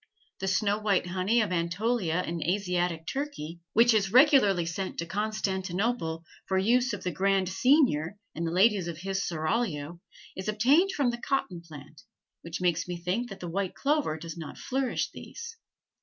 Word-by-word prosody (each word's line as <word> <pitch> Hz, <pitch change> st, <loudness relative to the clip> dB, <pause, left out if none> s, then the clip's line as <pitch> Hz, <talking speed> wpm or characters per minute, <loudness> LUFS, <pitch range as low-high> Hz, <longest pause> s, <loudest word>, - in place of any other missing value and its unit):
The 195 Hz, -, -3 dB
snow 205 Hz, +2 st, +1 dB
white 205 Hz, -4 st, +1 dB
honey 185 Hz, +6 st, +1 dB
of 210 Hz, -, -1 dB
Anatolia 180 Hz, +1 st, 0 dB
in 170 Hz, 0 st, -4 dB
Asiatic 180 Hz, -2 st, -1 dB
Turkey, 265 Hz, -, -4 dB
which 235 Hz, +1 st, +6 dB
is 200 Hz, -3 st, +2 dB
regularly 245 Hz, -, +5 dB
sent 180 Hz, +3 st, -4 dB
to 170 Hz, -, -2 dB
Constantinople 190 Hz, -2 st, -2 dB, 0.2 s
for 190 Hz, -1 st, +1 dB
the 190 Hz, -, -1 dB
use 250 Hz, +2 st, +3 dB
of -, -, -5 dB
the 180 Hz, -, -1 dB
grand 190 Hz, +2 st, +1 dB
seignior 200 Hz, -, +3 dB, 0.2 s
and 165 Hz, +1 st, -3 dB
the -, -, -2 dB
ladies 190 Hz, 0 st, +3 dB
of 170 Hz, -2 st, -5 dB
his 195 Hz, +3 st, -2 dB
seraglio, 170 Hz, -2 st, -2 dB, 0.3 s
is 190 Hz, -, -6 dB
obtained 270 Hz, -, +4 dB
from 280 Hz, -8 st, +1 dB
the 240 Hz, 0 st, -7 dB
cotton 220 Hz, -12 st, -1 dB
plant, 150 Hz, -2 st, -13 dB, 0.4 s
which 165 Hz, 0 st, -6 dB
makes 175 Hz, -1 st, +1 dB
me 175 Hz, -1 st, -4 dB
think 185 Hz, +8 st, -2 dB
that 195 Hz, -, -9 dB
the 175 Hz, -, -5 dB
white 190 Hz, +2 st, -2 dB
clover 285 Hz, -, 0 dB
does 165 Hz, 0 st, -7 dB
not 165 Hz, -2 st, -8 dB
flourish 265 Hz, -1 st, -1 dB
these. 470 Hz, 0 st, -9 dB
190 Hz, 170 wpm, -28 LUFS, 170-230 Hz, 0.4 s, which